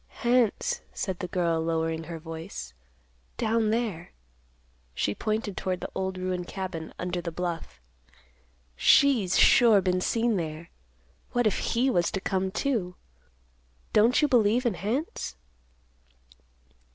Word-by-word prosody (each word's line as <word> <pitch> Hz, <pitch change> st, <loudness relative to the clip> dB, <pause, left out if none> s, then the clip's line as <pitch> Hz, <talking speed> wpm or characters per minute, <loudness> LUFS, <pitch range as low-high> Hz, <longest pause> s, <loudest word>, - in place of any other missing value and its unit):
"Hants," 250 Hz, -, +2 dB
said 190 Hz, -3 st, -3 dB
the 180 Hz, -, -3 dB
girl, 170 Hz, -2 st, 0 dB
lowering 160 Hz, 0 st, -1 dB
her 170 Hz, 0 st, -6 dB
voice; 160 Hz, -, -8 dB, 0.6 s
"down 225 Hz, 0 st, +1 dB
there." 215 Hz, -7 st, -2 dB, 0.8 s
She 100 Hz, -, 0 dB
pointed 215 Hz, -, -2 dB
toward 185 Hz, -1 st, -2 dB
the -, -, -6 dB
old 190 Hz, 0 st, -3 dB
ruined 185 Hz, -1 st, -3 dB
cabin 185 Hz, -4 st, -5 dB
under 180 Hz, 0 st, -3 dB
the 170 Hz, 0 st, -4 dB
bluff. 170 Hz, -, -5 dB, 1.0 s
"She's 235 Hz, -, +4 dB
sure 230 Hz, -4 st, +6 dB
been 185 Hz, -1 st, 0 dB
seen 230 Hz, +1 st, +1 dB
there. 160 Hz, -1 st, -5 dB, 0.6 s
What 245 Hz, -1 st, +2 dB
if 215 Hz, -, +1 dB, 0.2 s
he 245 Hz, +3 st, +3 dB
was 175 Hz, -6 st, +2 dB
to 195 Hz, -, -1 dB
come, 190 Hz, 0 st, -1 dB
too? 190 Hz, -5 st, -1 dB, 1.0 s
Don't 235 Hz, +7 st, +4 dB
you -, -, +5 dB
believe 240 Hz, -1 st, +3 dB
in 235 Hz, -, +2 dB
hants?" 230 Hz, -, -3 dB
190 Hz, 130 wpm, -27 LUFS, 170-225 Hz, 1.0 s, sure